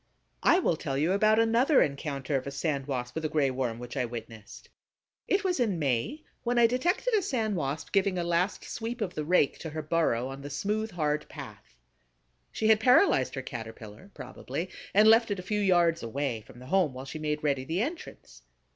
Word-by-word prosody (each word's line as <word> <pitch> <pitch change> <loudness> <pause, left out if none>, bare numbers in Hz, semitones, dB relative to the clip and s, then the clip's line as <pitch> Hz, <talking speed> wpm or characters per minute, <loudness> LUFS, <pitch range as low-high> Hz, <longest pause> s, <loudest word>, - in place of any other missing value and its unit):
I - - +5
will 175 - +1
tell 140 -4 -3
you 155 +5 +1
about 215 +2 +4
another 235 +6 +4
encounter 140 -1 -3
of 135 0 -2
a - - -4
Sand 140 -2 -2
Wasp 125 -3 -3
with 160 - -4
a 155 - 0
Gray 150 -3 +1
Worm 125 -3 -2
which 120 +2 -8
I 130 - 0
witnessed. 115 -2 -9 0.6
It 400 +1 +1
was 360 -5 0
in 215 -7 +1
May, 150 - -1 0.2
when 245 0 -1
I 235 - +6
detected 350 - +1
a 425 - +4
Sand 225 - -1
Wasp 145 -2 -3
giving 195 -2 +2
a 175 - 0
last 175 +3 0
sweep 235 +1 -5
of 190 -4 -2
the 155 - -3
rake 155 -2 +2
to 160 - -6
her 155 0 -5
burrow, 150 -6 +1
on 135 +1 -8
the 145 - -7
smooth, 210 +9 -2
hard 150 -5 -2
path. - - -11 0.8
She 220 - -1
had 220 -1 +6
paralyzed 220 - +4
her 135 - -4
Caterpillar, 115 - -9
probably, 175 +2 -6 0.2
and 210 +2 +5
left 225 +1 +6
it 205 - -1
a 180 - -6
few 210 +2 -1
yards 175 -4 +3
away 120 0 -3
from - - -14
the 125 - -12
home 175 -4 +1
while 130 +1 -7
she 155 +3 -7
made 150 0 -2
ready 140 -3 +1
the 165 +9 -1
entrance. 255 - -8
160 Hz, 210 wpm, -28 LUFS, 135-215 Hz, 0.8 s, I